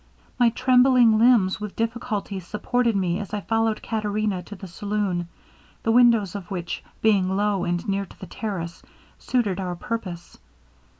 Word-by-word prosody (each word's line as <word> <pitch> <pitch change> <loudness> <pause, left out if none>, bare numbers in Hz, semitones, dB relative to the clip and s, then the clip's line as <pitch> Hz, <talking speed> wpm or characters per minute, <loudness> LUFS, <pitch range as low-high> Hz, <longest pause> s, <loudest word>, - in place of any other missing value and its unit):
My 240 -1 +6
trembling 250 -2 +4
limbs 220 -5 +4
with 210 -2 -6
difficulty 225 -4 -3
supported 230 +5 -1
me 185 -1 0
as 210 0 -5
I 205 - -3
followed 225 0 0
Caterina 215 -3 -1
to 205 +4 -10
the 190 0 -9
saloon, 195 -2 -2 0.6
the 225 - +2
windows 230 -5 +4
of 195 -4 -7
which 175 -3 -4 0.2
being 200 -4 +3
low 205 -3 +1
and 175 0 -2
near 200 0 -1
to - - -18
the - - -7
terrace, 180 -6 -5 0.4
suited 215 -8 0
our 180 -2 -3
purpose. 180 -3 -6
210 Hz, 155 wpm, -24 LUFS, 185-225 Hz, 0.6 s, My